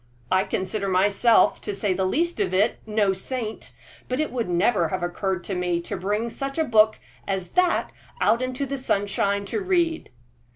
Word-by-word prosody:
"I 185 +1 +3
consider 195 +2 -2
myself, 200 +5 +3
to 205 - -4
say 195 -1 0
the 190 +1 0
least 335 - 0
of 400 - 0
it, 205 +5 +2
no 210 -2 +2
saint; 220 +3 -5 0.4
but 255 +2 -1
it 310 - -1
would 240 -5 -2
never 175 0 +2
have 165 - -3
occurred 175 0 -2
to 195 - -4
me 180 -1 0
to 200 - -5
bring 210 +5 -2
such 275 +3 -5
a 320 - +3
book 220 -3 +4 0.3
as 190 -2 -2
that 360 -1 +2 0.3
out 230 +3 +3
into 255 +2 -2
the 275 0 -4
sunshine 200 -3 0
to 410 - -3
read." 345 -4 0
210 Hz, 180 wpm, -24 LUFS, 190-255 Hz, 0.4 s, book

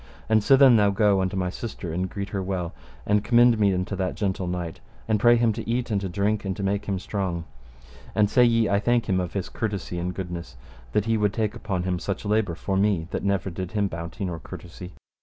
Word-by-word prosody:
And 110 -1 +4
sithen 135 +1 +6 0.2
go 105 -1 +4
thou - - +1
unto 95 +1 -1
my 90 -1 -1
sister 95 -6 -6
and 90 +2 -1
greet 100 +1 -5
her 100 -1 -2
well, 90 -3 -3 0.3
and 105 0 +2
commend 120 -1 +5
me 100 -2 +4
unto 90 +2 -2
that 95 -1 -2
gentle 95 -2 -2
knight, 90 -2 -4 0.3
and 110 -1 +2
pray 120 +3 +6
him 115 -2 +2
to 115 +1 -6
eat 120 0 -1
and 100 -2 +1
to 95 - -3
drink 100 +3 0
and 95 -1 -3
make 100 +1 -1
him 100 -2 0
strong, 90 -3 -3 0.7
and 105 -1 +4
say 125 +4 +4
ye 115 -1 +4
him 100 - 0
I 100 - +4
thank 120 +2 +1
him 95 -3 +2
of 90 -2 -3
his 95 -3 -2
courtesy 100 -5 -4
and 90 +1 -2
goodness, 85 -7 -6 0.4
that 105 - +2
he 115 -1 +2
would 105 -2 +1
take 110 0 -1
upon 95 -4 -3
him 90 -1 -1
such 100 +2 -4
labour 105 -4 +1
for 95 +3 -3
me 95 -5 +1
that - - -2
never 100 -1 0
did 90 +1 -6
him 105 -2 +1
bounty 85 +3 -5
nor 85 -3 -4
courtesy. 90 +3 -10
100 Hz, 235 wpm, -25 LUFS, 90-110 Hz, 0.7 s, sithen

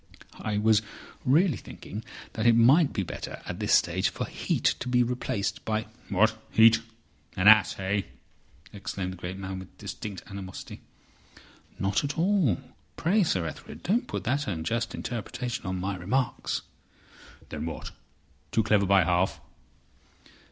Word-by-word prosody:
"I 105 -1 -2
was 110 0 +4 0.4
really 155 - +4
thinking 105 +3 -8 0.3
that 110 +1 0
it 115 - +7
might 135 +7 +6
be 100 - -1
better - - -6
at - - -5
this - - -1
stage - - +3
for - - -4
Heat - - -2 0.2
to 125 - -5
be 125 0 +4
replaced 120 -4 -2
by—" 110 0 -1 0.2
"What! 110 +3 +3
Heat? 115 0 +6 0.6
An 95 +2 +3
ass—eh?" 100 -2 +5 0.7
exclaimed 95 -2 -4
the - - -10
great 90 +2 -5
man, 95 -1 -5
with 95 - -12
distinct 100 -4 -6
animosity. 95 -2 -8 1.0
"Not 100 +5 +1
at 145 +1 -3
all. 170 - +3 0.4
Pray, 195 +6 +3
Sir 95 - +1
Ethelred, 80 - -8
don't 225 +7 +1
put - - -4
that 140 +4 0
unjust 110 +7 -2
interpretation 120 -1 -4
on 95 0 -2
my 95 +2 -2
remarks." 120 +9 -1 0.9
"Then - - -4
what? - - -6 0.6
Too 110 - +2
clever 105 -2 +3
by 100 -1 +5
half?" 90 +2 +1
110 Hz, 145 wpm, -28 LUFS, 95-125 Hz, 1.0 s, it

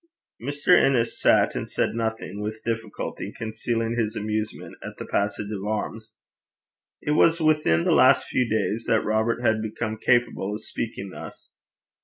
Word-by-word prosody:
Mr. 145 +7 +3
Innes 125 -7 +2
sat - - +4
and - - -4
said - - 0
nothing, 110 -3 -3
with 110 +1 -5
difficulty 115 -2 -4
concealing 115 +1 -2
his 110 -2 -1
amusement 110 0 -3
at - - -8
this - - -7
passage 105 +1 -1
of 100 -2 -4
arms. 110 +1 -3 0.9
It 150 - -1
was 160 +2 +4
but 160 - -1
within 150 - +3
the - - +2
last - - +5
few 125 -2 0
days 110 +1 0
that 110 - +2
Robert 110 +3 0
had 110 -2 +2
become 110 0 -3
capable 120 -5 +1
of 105 - -8
speaking 100 -4 -5
thus. - - -10
110 Hz, 160 wpm, -25 LUFS, 105-120 Hz, 0.9 s, last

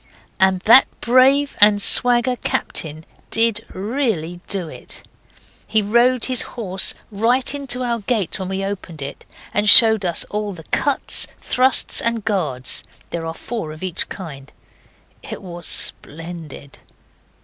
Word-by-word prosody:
And 190 -1 +2
that 235 +7 +6
brave 265 +4 +2
and 205 0 +5
swagger 245 +3 +4
captain 155 -7 -4 0.2
did 225 -1 +2
really 195 - -4
do 190 -4 -3
it. - - -9 0.6
He 220 -1 0
rode 240 +4 +1
his 255 -2 +4
horse 195 -5 -1 0.2
right 240 +6 +1
into 270 -3 -3
our 235 -1 -3
gate 210 -3 -3
when 190 -1 -6
we 190 0 -4
opened 185 -6 -7
it, 140 - -10 0.3
and 210 0 +1
showed 220 -1 +8
us 175 -2 0
all 210 -1 -4
the 165 -3 -13
cuts, 285 -1 +2
thrusts, 260 +1 +1
and 230 -2 -3
guards. 155 - -1 0.3
There 165 -1 -5
are 160 - -7
four 220 -9 -7
of 155 +3 -12
each 185 -3 -3
kind. 140 -8 -10 0.7
It - - -9
was 175 -2 -6
splendid. 160 -3 -3
205 Hz, 140 wpm, -18 LUFS, 175-240 Hz, 0.7 s, showed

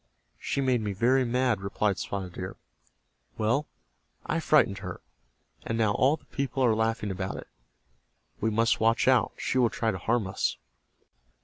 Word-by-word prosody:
"She 140 - -1
made 130 -3 +2
me 105 -2 -2
very 125 +7 +3
mad," 125 -3 +1
replied 100 0 0
Spotted 95 -3 -4
Deer. 90 +1 -6 0.8
"Well, 115 +7 +1 0.6
I - - 0
frightened 145 -11 +3
her, 90 -3 -6 0.6
and 115 - -2
now 110 -2 +3
all 135 +8 +3
the - - -27
people 135 -1 -1
are 115 - +4
laughing 110 -1 0
about 95 0 -4
it. - - -8 0.9
We 110 - +1
must 115 +1 +2
watch 115 +3 +2
out. 130 -3 +4
She 130 - 0
will 120 -2 +4
try 110 +1 -1
to 95 - -5
harm 115 +2 +1
us." 95 -9 -1
115 Hz, 165 wpm, -28 LUFS, 100-125 Hz, 0.9 s, are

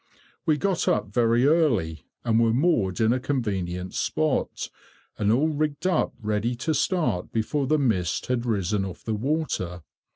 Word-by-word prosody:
We 155 -2 +4
got 195 +1 0
up 105 - +1
very 115 +3 +3
early, 115 - +2 0.2
and 115 -1 +3
were 115 -1 +3
moored 120 - +2
in 110 +1 +4
a 130 - 0
convenient 95 -9 -2
spot, 80 - -1 0.5
and 105 0 +2
all 140 +8 +3
rigged 150 +1 -2
up 185 -3 +1
ready 110 +2 -1
to 145 +6 -1
start 155 - 0
before 130 +5 -1
the 155 - +3
mist 95 - 0
had 125 -2 -1
risen 105 -3 0
off 95 -2 -7
the 110 - -2
water. 105 - -2
115 Hz, 160 wpm, -25 LUFS, 100-145 Hz, 0.5 s, We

